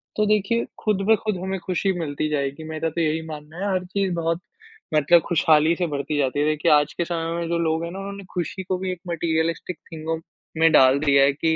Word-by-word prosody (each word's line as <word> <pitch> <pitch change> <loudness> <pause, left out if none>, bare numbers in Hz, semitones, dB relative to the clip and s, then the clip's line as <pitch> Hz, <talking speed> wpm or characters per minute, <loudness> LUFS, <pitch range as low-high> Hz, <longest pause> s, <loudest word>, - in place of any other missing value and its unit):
तो 215 - +2
देखिए 215 +2 +1 0.2
खुद 210 -3 +1
पे 220 - +6
खुद 215 -1 -2
होंगे 190 +1 -3
खुशी 190 +1 0
मिलती 155 -1 -2
जाएगी। 140 +1 -2
मैं 155 0 -5
तो 165 +1 -1
यही 160 0 0
मान 150 -2 -7
हूँ 195 +3 -2
हर 185 - 0
चीज़ 190 0 -1
बहुत 165 0 -1 0.5
मतलब 155 +3 +5
खुशहाली 160 -1 +4
से 175 0 -1
बढ़ती 145 0 -3
जाती 140 -1 0
है। 145 - +2
देखिए 155 0 +2
आज 150 0 +4
के 170 - -2
समय 165 -1 -3
में 170 - -3
जो 170 - +1
लोग 160 0 0
हैं 170 - -4
ना 190 - -7
उन्होंने 200 0 -7
खुशी 180 +2 -3
को 185 0 -2
भी 185 0 -3
एक 180 - -6
मैटेरियलिस्टिक 165 +1 -1
चीज़ों 160 0 -3 0.4
में 165 0 +5
डाल 130 -1 +6
दिया 140 -2 +4
है 140 - +4
कि 160 +3 0
165 Hz, 230 wpm, -23 LUFS, 155-185 Hz, 0.5 s, पे